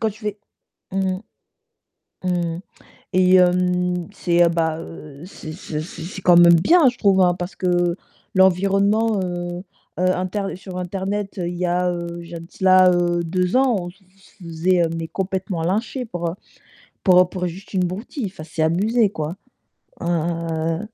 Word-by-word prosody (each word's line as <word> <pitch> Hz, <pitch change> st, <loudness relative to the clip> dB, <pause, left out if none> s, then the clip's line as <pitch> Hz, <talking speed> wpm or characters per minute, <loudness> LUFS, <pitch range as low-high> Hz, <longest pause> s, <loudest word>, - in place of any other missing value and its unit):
quand 220 Hz, -, +1 dB
tu 215 Hz, +2 st, -15 dB
fais 210 Hz, 0 st, -3 dB, 0.5 s
mmh 190 Hz, -1 st, 0 dB, 1.1 s
mh, -, -, 0 dB
mmh 170 Hz, -2 st, -1 dB
mh -, -, -7 dB, 0.5 s
et 185 Hz, 0 st, +4 dB
hem, 180 Hz, -1 st, +2 dB
c'est, 175 Hz, -3 st, +2 dB
heu, -, -, +4 dB
bah, 165 Hz, -1 st, 0 dB
heu, 155 Hz, -2 st, -10 dB
c'est 155 Hz, -4 st, -9 dB
c'est 150 Hz, -1 st, -5 dB
c'est 160 Hz, 0 st, -8 dB
c'est 190 Hz, +3 st, -7 dB
quand 175 Hz, -1 st, +6 dB
même 170 Hz, 0 st, +8 dB
bien 285 Hz, -, +5 dB
je 245 Hz, -, -2 dB
trouve, 195 Hz, -2 st, +3 dB
hein, 180 Hz, -1 st, +4 dB
parce 180 Hz, +1 st, -6 dB
que 175 Hz, -1 st, +1 dB, 0.4 s
l'environnement, 200 Hz, +4 st, +3 dB
heu, 175 Hz, 0 st, -4 dB, 0.3 s
heu, 185 Hz, +1 st, +2 dB
inter 195 Hz, +2 st, -3 dB
sur 185 Hz, -1 st, -8 dB
internet 195 Hz, +2 st, -3 dB
il 175 Hz, 0 st, -4 dB
y 180 Hz, -, -1 dB
a, 180 Hz, +1 st, +1 dB
heu, 170 Hz, 0 st, -5 dB
il 170 Hz, -, -12 dB
y -, -, -8 dB
a -, -, -5 dB
de 165 Hz, -, -11 dB
cela, 185 Hz, -1 st, +5 dB
heu, 175 Hz, 0 st, +1 dB
2 180 Hz, +5 st, 0 dB
ans, 260 Hz, -4 st, +3 dB
on 175 Hz, 0 st, -6 dB
se 180 Hz, -, -21 dB
f -, -, -31 dB, 0.3 s
se 180 Hz, -, -13 dB
faisait, 170 Hz, +2 st, +1 dB
heu, 165 Hz, -, -1 dB
mais 165 Hz, -1 st, -4 dB
complètement 190 Hz, -2 st, -3 dB
lyncher 225 Hz, +8 st, -1 dB
pour 175 Hz, -4 st, -3 dB, 0.7 s
pour 180 Hz, -2 st, +5 dB
pour 180 Hz, -1 st, -3 dB
juste 185 Hz, +4 st, -10 dB
une 185 Hz, -1 st, +2 dB
broutille, 210 Hz, -, -5 dB
enfin 180 Hz, -4 st, -10 dB
c'est 160 Hz, 0 st, -3 dB
abusé, 205 Hz, +6 st, +2 dB
quoi, 155 Hz, -1 st, -4 dB, 0.7 s
heu, 165 Hz, -1 st, -1 dB
180 Hz, 180 wpm, -21 LUFS, 170-190 Hz, 1.1 s, même